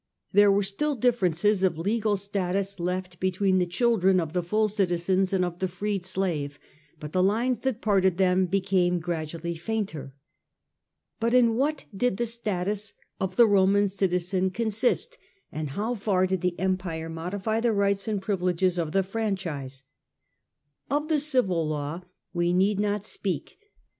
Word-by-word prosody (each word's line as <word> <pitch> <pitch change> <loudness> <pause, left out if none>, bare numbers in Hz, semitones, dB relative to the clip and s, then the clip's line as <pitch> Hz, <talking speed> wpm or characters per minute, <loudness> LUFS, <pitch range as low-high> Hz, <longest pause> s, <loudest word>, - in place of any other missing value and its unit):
There 205 +1 +6
were 200 +1 +3
still 280 +10 -1
differences 205 -5 +2
of 185 -4 +2
legal 210 +4 0
status 195 0 -2
left 180 0 -3
between 185 0 +1
the 180 - +1
children 190 -1 +3
of 160 -2 -3
the 180 - +1
full 215 +5 +1
citizen 190 -2 +1
and 185 -2 +2
of 175 0 -6
the 190 - 0
freed 190 +1 -3
slave, 165 -7 -2 0.4
but 150 -1 -7
the 185 - +2
lines 230 +5 +1
that 260 -3 -2
parted 190 -4 +2
them 185 -1 +3
became 185 -1 +1
gradually 165 0 -4
fainter. 170 -6 -4 1.0
But 230 +2 +1
in 235 -2 +5
what 285 +4 0
did 220 -1 0
the 240 - 0
status 210 -3 -3 0.2
of 185 -1 -2
the 200 -2 +5
citizen 185 -1 0
consist, 230 - -1 0.3
and 155 -1 -4
how 210 - -2
far 195 -4 +1
did 185 -1 -1
the 180 -1 -1
Empire 180 -3 -2
modify 190 +7 -2
the 235 0 +2
rights 200 0 +1
and 210 -2 0
privileges 185 -2 0
of 160 -2 -2
the 195 - +3
franchise? 185 -10 -3 1.1
Of 295 +2 -1
the 310 -2 +3
civil 245 - +2
law 150 +2 -3 0.3
we 175 0 +1
need 195 +2 +2
not 205 0 0
speak. 190 - -4
190 Hz, 155 wpm, -26 LUFS, 175-210 Hz, 1.1 s, There